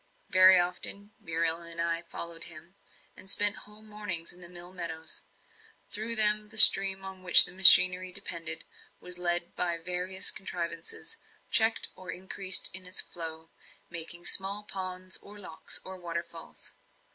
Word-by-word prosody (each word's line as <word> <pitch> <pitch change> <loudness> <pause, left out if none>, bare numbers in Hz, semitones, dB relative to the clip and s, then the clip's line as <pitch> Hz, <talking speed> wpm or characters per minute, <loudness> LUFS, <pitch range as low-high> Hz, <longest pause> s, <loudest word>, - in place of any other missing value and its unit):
Very 185 0 +4
often 190 +3 -6
Muriel 165 0 -1
and 170 0 -11
I 170 0 -5
followed 170 -1 -7
him, 170 +1 -13 0.4
and 190 - -13
spent 205 0 +1
whole 210 +1 -18
mornings 210 -6 -5
in 180 - -21
the 175 - -10
mill 175 0 -11
meadows. 160 -3 -6 0.7
Through 220 +2 -2
them 210 -1 +6
the 220 - -7
stream 195 -2 +6
on 190 -1 -13
which 180 -1 +9
the - - -7
machinery 185 0 +7
depended 170 - -1 0.4
was 180 0 -9
led 175 0 -1
by 170 -1 -4
various 180 +2 -3
contrivances, 170 -3 -9 0.3
checked 225 0 0
or 185 0 -15
increased 190 +2 -1
in 185 0 -4
its 180 - -3
flow, 165 -1 -11 0.4
making 170 +1 -6
small 200 +3 0
ponds, 185 -2 -7
or 205 +1 -17
locks, 175 -5 -6
or 190 0 -11
waterfalls. 170 -1 -11
180 Hz, 145 wpm, -25 LUFS, 170-190 Hz, 0.7 s, which